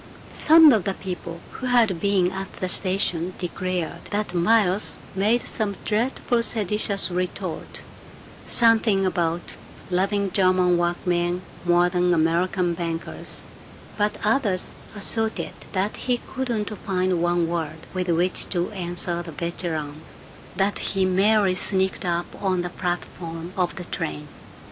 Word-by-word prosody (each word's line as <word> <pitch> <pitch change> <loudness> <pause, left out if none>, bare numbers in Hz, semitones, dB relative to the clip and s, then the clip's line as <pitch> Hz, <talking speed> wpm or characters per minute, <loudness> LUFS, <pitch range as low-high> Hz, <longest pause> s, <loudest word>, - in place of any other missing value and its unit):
Some 315 -2 +7
of 210 -5 +1
the 195 - -1
people 175 -2 -6
who 255 - -5
had 230 -8 +3
been 190 -2 +2
at 190 0 -5
the 185 - -3
station 185 -1 +1
declared 180 -1 -3
that 205 -2 -2
Miles 195 +2 +2 0.2
made 215 +5 +1
some 210 -3 -1
dreadful 235 +2 0
seditious 205 -4 0
retort: 180 +1 -4 0.7
something 225 -4 +4
about 175 -2 -1 0.3
loving 195 +2 +1
German 185 -1 +3
workmen 175 +1 0 0.2
more 175 0 +4
than 180 0 +2
American 175 +2 +1
bankers; 165 -1 -5 0.5
but 210 0 0
others 210 -5 +1 0.2
asserted 220 +2 -2 0.2
that 195 +2 -1
he 250 -1 0
couldn't 235 -5 -3
find 185 -3 0
one 175 -1 +2
word 160 -1 -4
with 185 -1 -2
which 175 +2 +2
to 175 +2 -1
answer 175 -2 -1
the 170 -1 -8
veteran; 155 -2 -4 0.5
that 195 +2 +1
he 195 -1 0
merely 195 +1 +3
sneaked 190 0 +1
up 175 0 0 0.2
on 185 -3 +1
the 175 - -4
platform 175 -1 -4
of 180 -2 0
the 180 - -6
train. 75 - -4
185 Hz, 130 wpm, -24 LUFS, 175-205 Hz, 0.7 s, Some